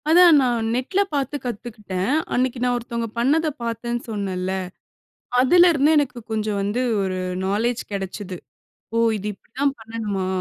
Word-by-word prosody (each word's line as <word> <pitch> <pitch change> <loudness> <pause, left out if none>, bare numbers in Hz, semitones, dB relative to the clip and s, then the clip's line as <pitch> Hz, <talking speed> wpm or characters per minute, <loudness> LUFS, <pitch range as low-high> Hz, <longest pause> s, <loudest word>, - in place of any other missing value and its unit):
அதான் 340 -1 +8
நான் 235 -3 +1
நெட்ல 260 +10 -1
பார்த்து 280 0 -1
கத்துக்கிட்டேன். 210 -3 -3 0.2
அன்னக்கி 255 0 0
நான் 245 0 +2
ஒருத்தவுங்க 235 -1 -3
பண்ணத 295 +7 +2 0.2
பார்த்தேன்னு 235 +1 -2
சொன்னேன்ல. 190 -3 -2 0.9
அதுலேருந்து 315 +1 +5
எனக்கு 270 -4 +1
கொஞ்சம் 215 -2 -1
வந்து 205 +5 -1 0.2
ஒரு 185 -1 -2 0.3
நாலேஜ் 225 +5 0
கிடைச்சிது. 195 -1 -4 0.6
ஓ! - - +2 0.2
இது 205 0 -6
இப்பிடிதான் 270 +8 -2
பண்ணணுமா? 215 -4 -3
235 Hz, 125 wpm, -22 LUFS, 205-260 Hz, 0.9 s, அதான்